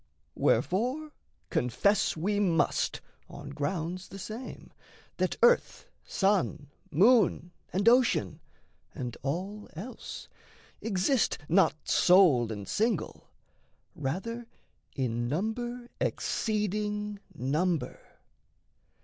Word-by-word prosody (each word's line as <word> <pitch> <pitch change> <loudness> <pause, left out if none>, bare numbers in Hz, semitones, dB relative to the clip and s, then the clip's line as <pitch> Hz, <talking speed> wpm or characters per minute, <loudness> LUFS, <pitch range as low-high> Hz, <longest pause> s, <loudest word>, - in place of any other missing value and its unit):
Wherefore 255 - +1 0.4
confess 190 - +2
we 205 +6 0
must 175 -6 +1 0.3
on 140 - -9
grounds 165 +5 -3
the 195 - -10
same 220 +6 -8 0.4
That - - 0
earth, 485 +1 +3 0.2
sun, 170 -7 0 0.2
moon, 195 - +4 0.2
and 195 +4 0
ocean, 235 - +4 0.6
and 125 -2 -4
all 190 +9 -4
else, 215 +11 -8 0.5
Exist 220 +4 +1
not 185 +1 +4
sole 160 - +5
and 100 -3 -6
single 225 +3 -1 0.6
rather 195 - -4 0.5
in 120 -2 -1
number 240 - -3
Exceeding 210 -1 -1 0.2
number. 155 +5 -1
195 Hz, 85 wpm, -29 LUFS, 155-220 Hz, 0.6 s, sole